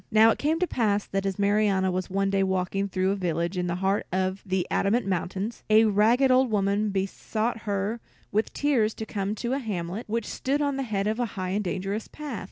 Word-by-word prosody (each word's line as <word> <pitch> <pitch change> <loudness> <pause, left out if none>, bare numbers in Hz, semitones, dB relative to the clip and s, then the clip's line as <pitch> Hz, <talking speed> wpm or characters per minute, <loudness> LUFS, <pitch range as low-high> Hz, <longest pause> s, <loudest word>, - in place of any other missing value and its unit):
Now 220 +1 +6
it - - -2
came 310 +3 +1
to 365 - +1
pass 210 - 0
that, 195 0 -2
as 195 - -2
Marianna 200 -2 +2
was 185 +1 -2
one 195 +1 0
day 195 0 +2
walking 190 +1 0
through 190 0 0
a - - 0
village 170 -1 -1
in 180 0 -1
the 170 - -1
heart 195 +2 0
of 185 +1 -1
the 190 -2 -1
Adamant 225 +5 +2
Mountains, 190 +4 -2
a 215 +1 +6
ragged 225 +6 +4
old 255 0 +4
woman 205 0 +1
besought 215 +4 -2
her 200 +3 -1 0.3
with 215 +2 0
tears 245 -7 +1
to 220 - -5
come 205 -1 -2
to 235 +3 -2
a 275 - 0
hamlet 200 -2 -4
which 230 0 -1
stood 275 +3 -1
at 285 -2 0
the 270 - -2
head 210 -6 -1
of 215 +3 -1
a 240 - +1
high 185 -1 -2
and 205 +3 0
dangerous 195 +3 -3
path. 290 -8 -6
200 Hz, 220 wpm, -26 LUFS, 190-225 Hz, 0.3 s, Now